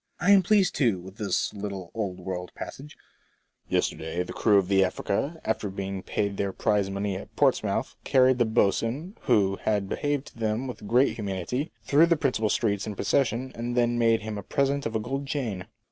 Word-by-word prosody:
I 200 - +3
am 200 -1 +8
pleased, 195 0 +3
too, 115 -10 +2
with 95 +3 -12
this 100 -5 -1
little 100 -3 -6
old 100 -5 -3
world 90 -1 -5
passage: 145 +2 -8 0.4
*' - - -41 0.3
Yesterday 80 +3 -1
the - - -8
crew 105 -2 +4
of 95 -2 +2
the 95 0 +4
Afiica, 100 - -1
after 110 -2 -1
being 95 0 -4
paid 100 +1 -2
their 100 -1 -1
prize 100 0 +1
money 100 0 -2
at 95 - -9
Portsmouth, - - +1
carried 130 -1 +4
the 120 - +4
boatswain, 115 - 0
who 95 -2 +3
had 105 -2 0
behaved 145 +4 -1
to - - -19
them 110 +3 -1
with 125 -5 -7
great 125 +5 +3
humanity, 105 - -3 0.2
tlirough 160 +4 +5
the 170 - +4
principal 125 -7 0
streets 105 -2 0
in 105 - -4
procession, 130 +2 0
and 120 +1 -4
then 120 0 +2
made 115 -1 +3
him 110 -1 -4
a - - -5
present 140 +6 0
of 115 - -6
a - - +2
gold 135 +5 -4
chain." 110 -11 -3
110 Hz, 195 wpm, -27 LUFS, 100-130 Hz, 0.4 s, am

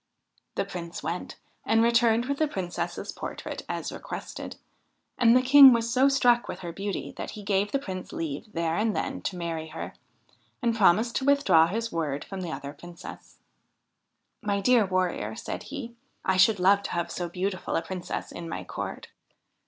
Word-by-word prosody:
The - - 0
Prince 170 -1 -7
went, 175 +2 -4 0.3
and 225 0 +3
returned 235 0 +4
with 280 +1 -2
the 310 - +3
Princess's 185 -10 -4
portrait - - -6
as - - -3
requested; - - -7 0.6
and 240 0 +6
the 255 - +2
King 270 0 +10
was 230 0 0
so 265 +2 +5
struck 245 -3 +3
with - - -6
her 175 -2 -5
beauty 195 +3 -4
that - - -5
he 210 - -8
gave 200 0 +1
the - - +2
Prince 190 -8 -6
leave 165 +7 -5
there 165 -3 -1
and 215 +1 +1
then - - -2
to 185 - -3
marry 165 -2 -3
her, - - -7 0.7
and 235 -1 +1
promised 220 +3 +4
to 265 - -2
with 280 0 +3
draw 165 -3 +6
his 225 +5 -3
word 150 -4 -2
from 195 -1 -6
the 175 -3 -4
other 140 -2 -6
Princess. 175 +3 -11 0.5
' - - -52
My 200 - +1
dear 230 0 +4
Warrior,' 180 - -1
said - - -5
he, 265 -4 -6 0.2
' - - -44
I 190 - +2
should 190 +2 +5
love 195 +2 +5
to - - -5
have 170 0 -2
so 175 -1 -3
beautiful 185 +1 -3
a 165 - 0
Princess 180 +1 -5
in 170 -1 -7
my - - -4
court.' - - -6
195 Hz, 190 wpm, -27 LUFS, 170-235 Hz, 0.7 s, King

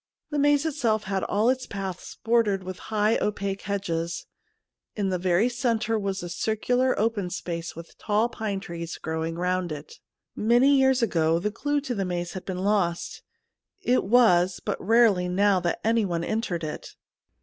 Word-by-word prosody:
The 295 - 0
maze 290 +1 +3
itself 235 -9 0
had 190 -1 -2
all 210 +3 +1
its 255 -1 -3
paths 190 -3 -6
bordered 225 -4 +2
with 185 0 -7
high 215 0 +2
opaque 200 -1 -2
hedges; 170 -4 -3 0.7
in 200 -2 -1
the 185 -1 -1
very 180 +5 +2
centre 235 -2 0
was 195 -2 -3
a - - -4
circular 235 +8 0
open 210 -4 0
space 170 -2 -5
with 165 +1 -11
tall 215 +2 +1
pine 215 -4 -3
trees 170 -3 -6
growing 160 +1 -3
round 180 0 -1
it. 150 0 -8 0.4
Many 240 +6 +4
years 265 -2 +3
ago 165 -6 +2
the 210 +5 -1
clue 290 +6 -1
to 265 -3 -3
the 200 -4 -1
maze 175 -1 -3
had 185 - -7
been 185 -1 -4
lost; 195 -4 0 0.6
it 250 +1 +2
was 190 -5 +4
but - - -3
rarely 215 -4 +4
now 195 +1 +3
that 175 -1 -1
anyone 205 -7 +1
entered 210 -5 -2
it. 155 - -6
200 Hz, 165 wpm, -26 LUFS, 175-230 Hz, 0.7 s, Many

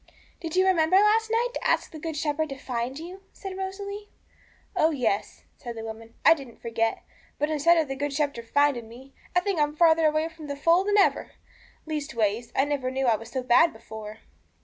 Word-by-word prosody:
'Did 330 -1 -5
you 370 0 +4
remember 355 -2 +3
last 425 +3 +4
night 465 +2 +1
to - - -5
ask - - +1
the 315 - -9
Good 320 0 -5
Shepherd 310 0 -1
to 275 - -6
find 250 0 -4
you,' 355 +4 -9
said 385 -1 -7
Rosalie. 400 +2 -6 0.7
'Oh 315 - +4
yes,' 240 -9 -2
said 235 -2 -8
the 225 - -5
woman, 225 +1 -9
'I 325 - +9
didn't 270 -7 -11
forget; 225 -1 -1 0.3
but 295 +2 0
instead 335 +3 +4
of 320 -2 +2
the 270 - -4
Good 290 +1 -2
Shepherd 280 -5 -2
finding 285 -6 +2
me, 260 +4 -14 0.2
I 360 - +5
think 390 -3 -1
I'm 295 0 +1
farther 325 -1 +5
away 310 +1 +1
from 325 -2 -11
the 285 - -4
fold 335 +7 +3
than 415 0 +3
ever; 400 - +2 0.5
leastways, 240 -8 -2
I 270 - +3
never 285 -3 -1
knew 265 +1 -1
I 235 -3 +4
was 225 +1 -9
so 260 +1 -3
bad 260 +7 +5
before.' 220 -1 -10
295 Hz, 205 wpm, -26 LUFS, 245-335 Hz, 0.7 s, I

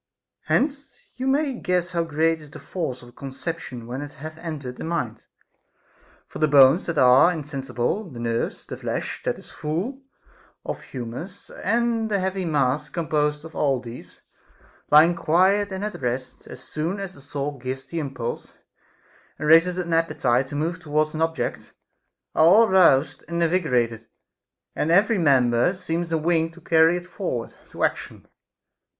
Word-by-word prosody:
Hence 280 +1 0 0.2
you 260 +1 -3
may 280 +1 +2
guess 180 -6 -1
how 170 -2 0
great 160 0 +1
is 150 - -13
the - - -11
force 140 -4 -5
of 120 - -13
a - - -17
conception 135 -2 -6
when 125 +4 -5
it 145 0 -8
hath 155 +2 -9
entered 145 -7 -6
the - - -6
mind; 145 -10 -3 1.0
for - - -9
the 155 - +3
bones 140 +3 +6
that 170 -2 -2
are 130 +6 +6
insensible, 145 - -3
the 130 - -11
nerves, 115 0 -2
the - - -7
flesh - - -4
that - - -1
is - - -13
full 175 - -3 0.6
of - - -4
humors, 135 +11 -8
and 230 -1 0
the 200 -2 +1
heavy 190 0 -2
mass 150 -1 0
composed 150 -2 -1
of 160 - -11
all 135 -3 +1
these, 120 0 -11 0.7
lying 160 +4 +6
quiet 190 +5 +2
and 190 +2 -3
at 210 -8 -6
rest, 125 +1 -4
as - - -10
soon 165 +6 -3
as 195 -2 -5
the 140 - -15
soul 140 0 -4
gives 130 +1 -5
the 170 - -4
impulse 130 -5 -5 0.8
and 150 - -3
raiseth 165 +3 +6
an 175 -2 -2
appetite 130 -6 +1
to 145 - -7
move 165 +5 -2
towards 155 -2 0
any 160 +1 0
object, 165 -1 -3 0.6
are 160 - +4
all 215 +7 +7
roused 165 -8 +4
and 170 0 -1
invigorated, 125 -10 0 0.7
and 155 - -1
every 200 +5 +4
member 130 +1 +3
seems 170 -1 -3
a 165 - +2
wing 165 0 +1
to 165 +1 -16
carry 165 +1 +4
it 175 - -7
forward 180 - -4 0.2
to - - -5
action. - - -2
160 Hz, 165 wpm, -24 LUFS, 135-180 Hz, 1.0 s, all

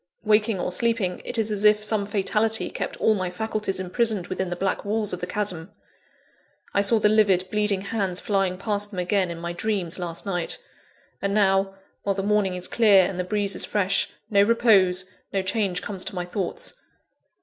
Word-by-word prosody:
Waking 215 -1 +2
or 180 - -2
sleeping, 225 -4 0
it - - -3
is 220 -1 +1
as 205 -1 -1
if 210 0 +5
some 210 -2 0
fatality 215 +2 +1
kept - - -4
all 220 - +3
my 185 -3 -2
faculties 210 0 -3
imprisoned 200 +1 0
within 185 0 -3
the 175 - -3
black 190 +2 -2
walls 210 0 0
of 180 - -5
the 180 - -3
chasm. 185 -3 -2 1.0
I 200 - +3
saw 200 +3 +5
the 210 - +3
livid, 200 -4 +3
bleeding 210 -2 +1
hands 195 -3 -2
flying 195 -3 0
past 205 +1 -2
them 200 - -10
again, 180 +1 +1
in 170 - -5
my 170 +1 -5
dreams, 185 -2 -2
last 170 -1 -4
night. 175 -4 -1 0.6
And 200 0 -1
now, 195 -1 +2 0.3
while 200 -1 -1
the 195 - -2
morning 205 -2 +1
is 180 0 -3
clear 205 -5 +5
and 185 -2 -5
the - - 0
breeze 200 +1 -1
is - - +2
fresh, 195 -1 0 0.2
no 200 -1 +5
repose, 200 -5 +4 0.3
no 195 -1 0
change 190 -2 -1
comes 195 -3 -4
to - - -5
my 180 -1 -3
thoughts. 215 - -3
200 Hz, 195 wpm, -24 LUFS, 185-210 Hz, 1.0 s, if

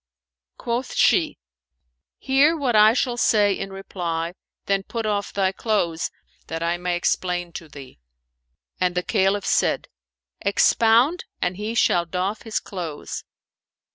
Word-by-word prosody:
Quoth 245 +2 -3
she, - - +3 0.8
"Hear 280 +5 +3
what 260 -6 0
I 215 +1 +7
shall 245 -1 0
say 210 -4 +3
in 195 +1 -5
reply; 175 -3 -4 0.3
then 195 0 +1
put 225 +3 -5
off 205 -1 -1
thy 190 -1 +1
clothes, 190 -6 -1 0.4
that 165 +1 -4
I 170 +1 0
may 180 0 -1
explain 175 0 -1
to 165 - -8
thee;" 135 - -12 0.8
and 180 -1 +1
the 180 - 0
Caliph 195 -1 +1
said, - - +1 0.5
"Expound, 230 - +3
and 180 +1 -1
he 210 +4 -4
shall 175 -6 +3
doff 185 +5 -2
his 225 -1 -2
clothes." 170 -6 -6
195 Hz, 135 wpm, -23 LUFS, 175-225 Hz, 0.8 s, I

